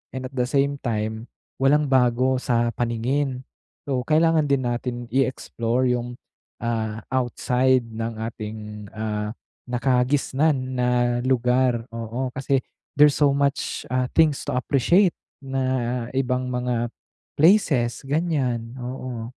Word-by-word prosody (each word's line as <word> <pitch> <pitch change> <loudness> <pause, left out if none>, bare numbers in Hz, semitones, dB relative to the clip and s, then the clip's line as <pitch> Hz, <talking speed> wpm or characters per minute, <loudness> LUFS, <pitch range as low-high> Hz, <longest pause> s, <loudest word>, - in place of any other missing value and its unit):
and 130 0 -4
at 130 - -18
the 125 -1 +1
same 140 +2 +1
time 110 0 -3 0.3
walang 145 +2 +4
bago 130 0 +3
sa 120 -2 +1
paningin. 125 +3 -1 0.4
So, 130 -3 0
kailangan 160 -1 +3
din 140 -2 +1
natin 120 0 -3
i-explore 130 -1 0
yung, 120 0 -2 0.5
ah, 110 -2 -2
outside 130 0 +2
ng 115 0 -5
ating, 110 -1 -5 0.4
ah, 105 -1 -2 0.4
nakagisnan 130 +2 +1
na 125 0 +1 0.4
lugar, 125 -2 +2
oo. 115 +3 -3
Kasi 135 0 +1 0.4
there's 145 0 +6
so 145 -2 +4
much, 140 0 -1
ah, 130 0 +1
things 155 -3 +3
to - - -1
appreciate 160 - +3 0.3
na 130 -2 -1
ibang 125 -1 0
mga 125 -1 -1 0.5
places 155 - +3
ganyan, 135 -6 -1
oo. 125 -2 -5
125 Hz, 120 wpm, -23 LUFS, 120-135 Hz, 0.5 s, there's